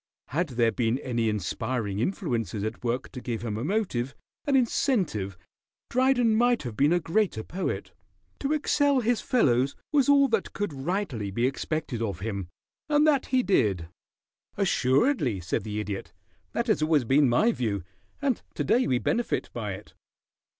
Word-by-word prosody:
Had 170 Hz, +6 st, 0 dB
there 115 Hz, -2 st, +4 dB
been 115 Hz, 0 st, 0 dB
any 120 Hz, -4 st, -1 dB
inspiring 105 Hz, +1 st, -2 dB
influences 120 Hz, -, -1 dB
at 110 Hz, +3 st, -4 dB
work 125 Hz, +2 st, -2 dB
to 125 Hz, -, -7 dB
give 120 Hz, -2 st, -4 dB
him 110 Hz, -3 st, -2 dB
a 110 Hz, -, -3 dB
motive, 145 Hz, -, -1 dB, 0.3 s
an 280 Hz, -, +2 dB
incentive, 190 Hz, -, +1 dB, 0.5 s
Dryden 250 Hz, -2 st, +3 dB
might 240 Hz, +1 st, +3 dB
have 120 Hz, -4 st, -5 dB
been 145 Hz, +5 st, +3 dB
a 175 Hz, -, +4 dB
greater 170 Hz, -, 0 dB
poet. 185 Hz, -, -4 dB, 0.5 s
To 280 Hz, -, -1 dB
excel 285 Hz, -2 st, +2 dB
his 235 Hz, 0 st, +1 dB
fellows 135 Hz, -, +2 dB, 0.2 s
was 285 Hz, -1 st, +4 dB
all 280 Hz, -1 st, +6 dB
that 225 Hz, -4 st, 0 dB
could 205 Hz, -6 st, -2 dB
rightly 140 Hz, -, -2 dB
be 115 Hz, +5 st, 0 dB
expected 135 Hz, -2 st, -2 dB
of 100 Hz, -6 st, -3 dB
him, 100 Hz, -4 st, -3 dB, 0.4 s
and 295 Hz, 0 st, +4 dB
that 290 Hz, -4 st, +3 dB
he 255 Hz, -1 st, +2 dB
did." 95 Hz, -, +1 dB, 0.7 s
"Assuredly," 140 Hz, -, +2 dB
said 85 Hz, -, -2 dB
the 105 Hz, -1 st, -3 dB
Idiot. 100 Hz, -2 st, -5 dB, 0.4 s
"That 235 Hz, -, 0 dB
has 215 Hz, -9 st, +1 dB
always 155 Hz, -3 st, +3 dB
been 135 Hz, +3 st, +4 dB
my 210 Hz, -, +4 dB
view, 105 Hz, -, -2 dB, 0.4 s
and 270 Hz, -5 st, +1 dB
to -, -, -1 dB
day 250 Hz, +2 st, +3 dB
we 125 Hz, -, +2 dB
benefit 235 Hz, -, -1 dB
by -, -, -3 dB
it. -, -, -11 dB
140 Hz, 165 wpm, -27 LUFS, -, 0.7 s, all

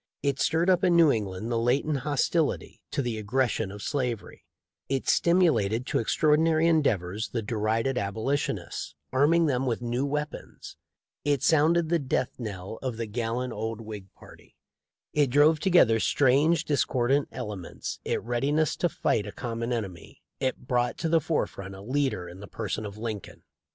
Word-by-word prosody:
It 140 Hz, -1 st, 0 dB
stirred 165 Hz, +2 st, +2 dB
up 185 Hz, -1 st, +3 dB
in 180 Hz, -2 st, +4 dB
New 165 Hz, -3 st, +6 dB
England 105 Hz, 0 st, -3 dB
the 115 Hz, -, +1 dB
latent 135 Hz, +5 st, +1 dB
hostility 150 Hz, +3 st, -1 dB
to 140 Hz, -, -1 dB
the 115 Hz, -3 st, -2 dB
aggression 110 Hz, -1 st, 0 dB
of 100 Hz, 0 st, -8 dB
slavery; 125 Hz, -9 st, -3 dB, 0.5 s
it 135 Hz, -1 st, -1 dB
stimulated 125 Hz, -, +3 dB
to -, -, 0 dB
extraordinary 155 Hz, +6 st, +3 dB
endeavors 110 Hz, -, +1 dB
the 115 Hz, -2 st, -3 dB
derided 115 Hz, +4 st, 0 dB
Abolitionists, 110 Hz, +8 st, -2 dB, 0.2 s
arming 160 Hz, +6 st, +4 dB
them 135 Hz, -3 st, 0 dB
with 120 Hz, 0 st, -1 dB
new 120 Hz, +2 st, -1 dB
weapons; 150 Hz, +1 st, -5 dB, 0.5 s
it 145 Hz, -2 st, +1 dB
sounded 160 Hz, +2 st, +3 dB
the 170 Hz, 0 st, +2 dB
death 130 Hz, -3 st, -2 dB
knell 100 Hz, -2 st, -6 dB
of 130 Hz, -4 st, -3 dB
the 115 Hz, -, -2 dB
gallant 115 Hz, +3 st, -3 dB
old 110 Hz, +1 st, -4 dB
Whig 105 Hz, -4 st, -9 dB
party; -, -, -17 dB, 0.6 s
it 145 Hz, -3 st, +3 dB
drove 150 Hz, +4 st, +5 dB
together 155 Hz, -, +4 dB
strange, 145 Hz, +8 st, +3 dB
discordant 135 Hz, -1 st, +1 dB
elements 100 Hz, -5 st, -6 dB
it -, -, -2 dB
readiness 140 Hz, +6 st, +1 dB
to 175 Hz, -, +1 dB
fight 105 Hz, -9 st, 0 dB
a -, -, -5 dB
common 115 Hz, +1 st, -4 dB
enemy; 95 Hz, -8 st, -5 dB, 0.2 s
it 130 Hz, -2 st, -2 dB
brought 120 Hz, -1 st, 0 dB
to 165 Hz, -, -2 dB
the 165 Hz, 0 st, +4 dB
forefront 100 Hz, -, -3 dB
a 95 Hz, -, -10 dB
leader 130 Hz, -5 st, -1 dB
in 90 Hz, +2 st, -11 dB
the 100 Hz, -, -9 dB
person 110 Hz, 0 st, -4 dB
of 100 Hz, 0 st, -10 dB
Lincoln. 110 Hz, -3 st, -6 dB
125 Hz, 160 wpm, -27 LUFS, 110-150 Hz, 0.6 s, New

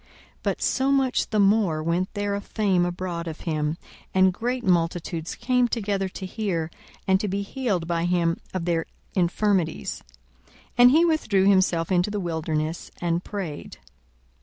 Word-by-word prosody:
42:005:015 -, -, -29 dB, 0.3 s
But -, -, -2 dB
so 270 Hz, +1 st, +2 dB
much 270 Hz, -2 st, +2 dB
the 215 Hz, -, +1 dB
more 195 Hz, -6 st, +3 dB
went 175 Hz, +3 st, 0 dB
there 205 Hz, 0 st, -1 dB
a 200 Hz, -, -2 dB
fame 190 Hz, -5 st, +1 dB
abroad 175 Hz, -1 st, -4 dB
of 160 Hz, -1 st, -6 dB
him: 155 Hz, -1 st, -1 dB, 0.4 s
and 190 Hz, 0 st, +5 dB
great 245 Hz, +5 st, -2 dB
multitudes 170 Hz, -2 st, 0 dB
came 250 Hz, 0 st, +2 dB
together 200 Hz, -4 st, -1 dB
to 190 Hz, -, -7 dB
hear, 185 Hz, -5 st, -2 dB, 0.4 s
and 190 Hz, 0 st, +4 dB
to 210 Hz, -, -2 dB
be 200 Hz, +1 st, -1 dB
healed 200 Hz, -6 st, -2 dB
by 170 Hz, 0 st, 0 dB
him 175 Hz, -1 st, +1 dB
of 185 Hz, -3 st, -3 dB
their 165 Hz, -2 st, 0 dB, 0.3 s
infirmities. 185 Hz, -1 st, 0 dB, 0.5 s
42:005:016 -, -, -27 dB, 0.2 s
And 245 Hz, 0 st, +9 dB
he 320 Hz, +6 st, +5 dB
withdrew 215 Hz, -, +2 dB
himself 185 Hz, -3 st, +3 dB
into 180 Hz, +2 st, +2 dB
the 205 Hz, 0 st, -2 dB
wilderness, 160 Hz, -2 st, -2 dB
and 170 Hz, 0 st, 0 dB
prayed. 185 Hz, -8 st, -6 dB
185 Hz, 160 wpm, -25 LUFS, 170-210 Hz, 0.5 s, And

